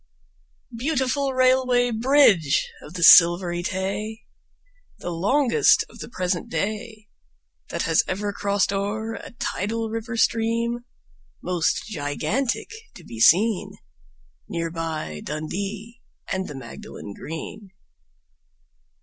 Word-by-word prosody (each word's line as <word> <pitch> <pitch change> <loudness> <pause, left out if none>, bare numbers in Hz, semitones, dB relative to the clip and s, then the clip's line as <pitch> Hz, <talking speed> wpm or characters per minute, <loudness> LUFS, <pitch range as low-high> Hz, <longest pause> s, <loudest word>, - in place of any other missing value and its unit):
Beautiful 270 +1 0
Railway 255 -1 +3
Bridge 225 - +4
of 155 - -12
the 175 - -2
Silvery 175 +1 +7
Tay! 200 +4 -3 0.7
The 175 - -5
longest 255 - +3
of - - -15
the - - -7
present 180 -4 -2
day 215 +5 -4 0.6
That - - -2
has - - +3
ever 205 +2 -2
crossed 200 -1 0
o'er 215 +3 -2
a - - -8
tidal 225 0 -3
river 230 +1 -4
stream, 230 +1 0 0.6
Most 175 -3 0
gigantic 190 - -2 0.2
to 175 - -12
be 115 -7 -9
seen, 200 - +4 0.8
Near 165 -1 -3
by 160 - -4
Dundee 200 - -5 0.3
and 190 0 -2
the 145 - -8
Magdalen 115 -4 -9
Green. 165 - -8
205 Hz, 105 wpm, -24 LUFS, 175-230 Hz, 0.8 s, Silvery